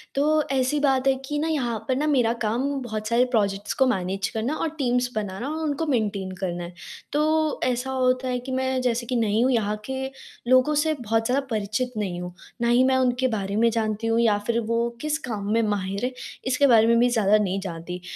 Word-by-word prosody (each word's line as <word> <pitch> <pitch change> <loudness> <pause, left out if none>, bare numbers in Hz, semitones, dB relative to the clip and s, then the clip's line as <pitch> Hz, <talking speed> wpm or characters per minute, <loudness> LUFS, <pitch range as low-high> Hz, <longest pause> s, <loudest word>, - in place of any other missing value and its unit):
तो 305 +2 +3
ऐसी 265 +2 +1
बात 270 -2 +2
है 270 - +5
कि 295 +2 -3
ना 315 - 0
यहाँ 255 -8 -1
पर 260 - +1
ना 300 +3 0
मेरा 245 -6 +3
काम 235 +5 0
बहुत 215 -3 -4
सारे 235 +2 +3
प्रोजेक्ट्स 200 -3 0
को 265 - +3
मैनेज 195 -2 -1
करना 230 +7 -2
और 325 - -1
टीम्स 250 -2 +1
बनाना 210 +4 -3
और 315 +1 -3
उनको 300 +1 -1
मेंटेन 210 -9 -1
करना 175 -2 -2
है। 175 +1 -8 0.4
तो 310 +1 +1
ऐसा 250 +1 -1
होता 255 0 +1
है 250 -1 -1
कि 255 +2 -7
मैं 260 0 0
जैसे 240 -1 0
कि 250 - -2
नई 220 -2 +2
हूँ 255 +2 +3
यहाँ 210 -3 0
के 265 0 -3 0.4
लोगों 255 +4 +4
से 315 -1 +1
बहुत 225 -5 -1
ज़्यादा 270 +4 +1
परिचित 215 +3 -2
नहीं 185 -4 -3
हूँ, 180 0 -6 0.3
ना 235 - +2
ही 245 +2 +5
मैं 260 0 +3
उनके 255 0 +2
बारे 200 0 -3
में 230 +2 +4
जानती 220 -1 -1
हूँ 225 +1 +2
या 220 -3 +3
फिर 235 0 +1
वो 230 +1 0
किस 305 0 0
काम 205 -2 -3
में 230 - +3
माहिर 200 0 -1
है 255 - -2 0.3
इसके 280 +2 +3
बारे 225 -3 +6
में 235 0 +4
भी 245 +1 +4
ज़्यादा 215 -3 +3
नहीं 195 -2 0
जानती। 180 -1 -6
240 Hz, 220 wpm, -24 LUFS, 210-260 Hz, 0.4 s, बारे